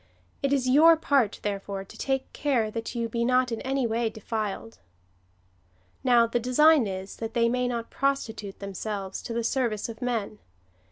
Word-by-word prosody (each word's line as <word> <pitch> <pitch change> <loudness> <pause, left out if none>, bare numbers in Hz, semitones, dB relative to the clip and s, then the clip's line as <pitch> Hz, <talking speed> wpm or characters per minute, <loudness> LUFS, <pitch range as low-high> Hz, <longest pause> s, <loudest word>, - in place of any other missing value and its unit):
It 275 -2 0
is 270 -2 +1
your 320 +5 +7
part, 275 -9 +1
therefore, 200 -1 -3
to 195 - -15
take 270 -1 -2
care 245 -7 0
that 230 +2 -5
you 235 -1 -1
be 235 +1 -2
not 250 0 +2
in 230 - -3
any 270 -1 0
way 230 0 0
defiled." 220 0 -5 1.2
Now, 240 -2 +5
the 230 +1 -1
design 280 +3 +5
^ - - -3
is, 190 - -11
that 225 +1 -5
they 235 -1 +3
may 250 +1 0
not 235 -2 -4
prostitute 230 -7 -2
themselves 200 0 -5
to - - -7
the 235 - -1
service 235 -3 -1
of 230 +2 -9
men. 225 -4 -2
235 Hz, 175 wpm, -27 LUFS, 220-255 Hz, 1.2 s, your